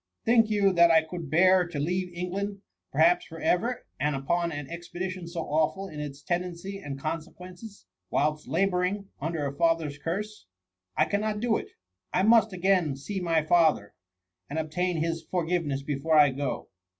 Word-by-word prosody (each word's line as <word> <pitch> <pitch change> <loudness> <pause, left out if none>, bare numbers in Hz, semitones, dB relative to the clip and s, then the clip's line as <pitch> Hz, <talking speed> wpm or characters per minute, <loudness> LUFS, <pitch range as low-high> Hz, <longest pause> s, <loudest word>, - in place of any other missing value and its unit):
Think 225 -1 +4
you, 200 -2 +3
that 170 -1 +6
I 160 -1 +5
could 160 -1 -7
bear 180 +3 +5
to 170 - -6
leave 180 +5 -1
England, 195 +3 -4 0.3
per - - -9
haps 350 +1 +4
for 165 -1 -10
ever, 235 +11 0
and 150 +1 +1
upon 170 +6 0
an 145 -2 -5
expedition 175 +2 -6
so 170 0 -4
awful 160 +6 0
in 150 -5 -8
its 145 -1 -6
tendency 180 +2 -3
and 140 -6 -6
consequences, 180 +7 -7 0.2
whilst 150 +1 0
labour 185 -2 +1
ing 195 +2 -2
under 160 0 -2
a 140 - -3
father'^s 160 -2 0
curse? 205 - -4 0.5
I 155 - +4
cannot 210 +4 -1
da 230 0 +1
it. - - -6 0.4
I 185 - +2
must 220 0 +5
again 180 -5 +1
see 145 +9 -5
my 165 -3 +1
father, 155 -11 +3 0.6
and 145 - -4
obtain 165 +3 -1
his 165 +1 -1
for 180 -3 0
giveness 160 -6 -1
before 145 +3 0
I 145 -2 +7
go." 140 +1 -4
170 Hz, 175 wpm, -27 LUFS, 155-190 Hz, 0.6 s, I